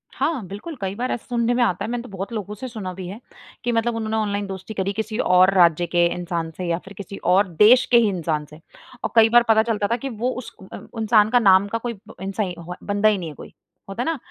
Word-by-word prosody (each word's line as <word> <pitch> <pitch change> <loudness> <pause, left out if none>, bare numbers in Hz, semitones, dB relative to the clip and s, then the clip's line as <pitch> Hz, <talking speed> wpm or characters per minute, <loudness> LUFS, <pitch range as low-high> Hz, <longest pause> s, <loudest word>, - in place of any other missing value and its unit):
हाँ, 275 - -1
बिल्कुल। 210 - -7
कई 195 +1 -3
बार 250 +3 -2
ऐसे 240 - -4
सुनने 240 0 +1
में 245 - +2
आता 185 -7 0
है, - - -5
मैंने 245 -1 -2
तो 250 - -11
बहुत 195 +3 -6
लोगों 210 -1 -5
से 255 +5 -7
सुना 205 -6 -6
भी 185 -1 -7
है, 200 +4 -8 0.4
कि 240 - 0
मतलब 230 0 0
उन्होंने 220 0 -2
ऑनलाइन 205 -1 -1
दोस्ती 190 +3 -7
करी 195 0 -2
किसी 220 +1 -4
और 185 -2 +4
राज्य 175 -2 +4
के 175 0 +3
इंसान 170 -2 -4
से 180 - -4
या 170 - 0
फिर 195 - -11
किसी 200 0 -8 0.2
और 195 +2 +4
देश 240 +5 +7
के 240 - +7
ही 225 -3 +4
इंसान 160 -5 -2
से। 150 +1 -14 0.4
और - - -2
कई 225 0 +7
बार 240 0 +6
पता 220 0 +5
चलता 215 -3 -1
था 235 - +3
कि 270 +3 -5
वो 240 +2 -2
उस 255 -1 -7 0.2
अ, - - -5 0.2
इंसान 215 -1 +4
का 245 - +4
नाम 195 -2 +5
का 230 - -2
कोई 235 -1 -5 0.2
इंसा 195 +2 -2
अ, 185 - -3
कोई 180 +1 -7
बंदा 205 +1 +3
ही 210 - +1
नहीं 170 -3 -5
है 150 - -11
कोई। - - -12 0.4
होता 195 +5 -3
है - - -5
ना, 325 -2 -1
210 Hz, 270 wpm, -22 LUFS, 190-235 Hz, 0.4 s, देश